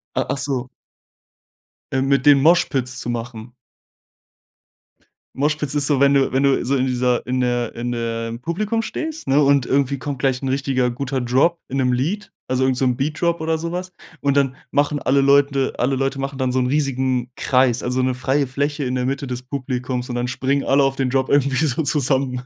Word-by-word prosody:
Ah, - - 0
achso. 135 -2 -2 1.2
Äh 130 - 0
mit 135 0 +1
denen 140 -2 +6
Moshpits 135 -6 +2
zu 120 - -4
machen. 120 0 -6 1.8
Moshpits 150 +1 -1
ist 145 -1 +1
so, 145 -3 +2
wenn 140 0 +5
du 135 -1 +2
wenn 135 +1 +2
du 135 -2 +2
so 140 +2 +1
in 130 0 +1
dieser 125 -1 0
in 130 0 0
der 120 -2 -1
in 120 +1 -3
der 115 -1 -3
im 115 +1 -6
Publikum 210 - -1
stehst, 315 +7 -5
ne, 140 +2 +4
und 140 -2 +3
irgendwie 140 0 0
kommt 140 -2 -5
gleich 135 -2 0
'n 135 - -2
richtiger 130 -2 0
guter 130 +1 -3
Drop 135 +8 +2
in 135 - -3
'nem 125 -2 +2
Lied 170 +12 -2 0.2
also 130 0 +1
irgend 130 -1 +1
so 130 - +1
'n 125 -1 +2
Beat 150 +4 -2
Drop 170 -1 +1
oder 160 0 0
so 170 +2 -5
was. 185 +1 -4 0.3
Und 140 0 +1
dann 135 -2 +2 0.2
machen 145 +1 +1
alle 135 +2 +2
Leute 140 -1 +3
alle 130 +2 +1
Leute 135 +1 -1
machen 135 0 -4
dann 130 -1 0
so 130 - +2
'n 125 - +1
riesigen 130 -3 0
Kreis, 130 -2 +2
also 125 +1 0
'ne 130 0 +1
freie 135 +2 0
Fläche 145 +2 -2
in 125 +1 -2
der 125 0 -1
Mitte 140 +1 -2
des 125 0 -5
Publikums 125 -2 -4
und 120 - -3
dann 120 0 -1
springen 135 +2 0
alle 140 +1 +3
auf 135 0 +1
den 130 -2 -1
Drop 130 0 0
irgendwie 140 +1 +2
so 150 +3 0
zusammen. 135 -3 0
135 Hz, 210 wpm, -21 LUFS, 125-140 Hz, 1.8 s, denen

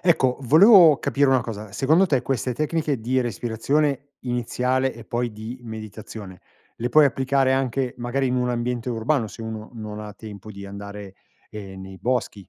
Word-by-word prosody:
Ecco, 135 -8 +2
volevo 165 - +7
capire 140 +1 +1
una 130 -2 +4
cosa, 110 -3 -7
secondo 155 - +3
te 135 -6 +1
queste 125 -2 -1
tecniche 155 -2 -1
di 130 +3 +1
respirazione 135 +5 -1
iniziale 125 +1 -1
e 115 -1 -11
poi 120 0 -2
di 110 +4 -8
meditazione 110 -3 -9 0.4
le 120 - -2
puoi 150 +5 +6
applicare 135 0 +2
anche 130 -1 -1
magari 125 +3 -1
in 125 - 0
un 125 0 0
ambiente 120 0 -2
urbano, 120 +1 0
se 115 - -10
uno 110 -1 -6
non 105 -1 -7
ha 105 -1 -7
tempo 105 0 -10
di 100 -1 -9
andare, 100 0 -8 0.4
ehm, 95 -2 -8
nei 95 0 -10
boschi? 110 -4 -2
120 Hz, 170 wpm, -23 LUFS, 110-135 Hz, 0.4 s, volevo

